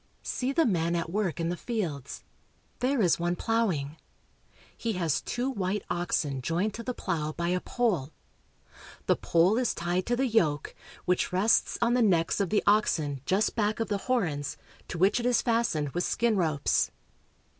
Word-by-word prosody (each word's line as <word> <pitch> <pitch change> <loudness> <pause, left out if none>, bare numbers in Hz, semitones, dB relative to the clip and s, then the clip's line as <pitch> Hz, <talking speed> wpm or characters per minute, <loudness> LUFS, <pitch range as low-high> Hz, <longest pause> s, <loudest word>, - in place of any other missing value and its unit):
See 255 +1 -2
the 325 +4 +3
men 170 -6 +1
at 165 -1 -2
work 195 -4 -1
in 165 0 0
the 175 - -1
fields. 170 - -4 0.6
There 255 -2 +1
is 175 -2 +3
one 175 +1 0
plow 225 +3 +1
ing. 145 -2 -3 0.8
He 230 -1 -2
has 165 -7 0
two 245 +2 -2
white 200 -5 -2
oxen 160 -6 -1
joined 175 +10 -1
to 230 - -6
the 250 +1 -4
plow 155 -5 -2
by 170 +1 -2
a 180 +1 +1
pole. 185 - -1 1.0
The - - +3
pole 180 +7 +2
is 255 - 0
tied 175 +2 -1
to 240 - +2
the 265 +2 +1
yoke, 165 - +1 0.3
which 180 0 +1
rests 195 +5 +2
on 235 +1 +3
the 250 - +3
necks 175 -6 +2
of 195 -3 0
the 210 - +2
oxen 155 -10 +2
just 200 +3 +1
back 215 -1 0
of 225 -3 -2
the 205 -1 0
horns, 160 - 0 0.3
to - - -5
which 195 +7 +3
it 240 - -3
is 245 - +2
fast 230 -5 +1
ened 145 -3 -2
with 175 - 0
skin 235 -2 +1
ropes. 160 -6 +1
185 Hz, 185 wpm, -28 LUFS, 165-225 Hz, 1.0 s, the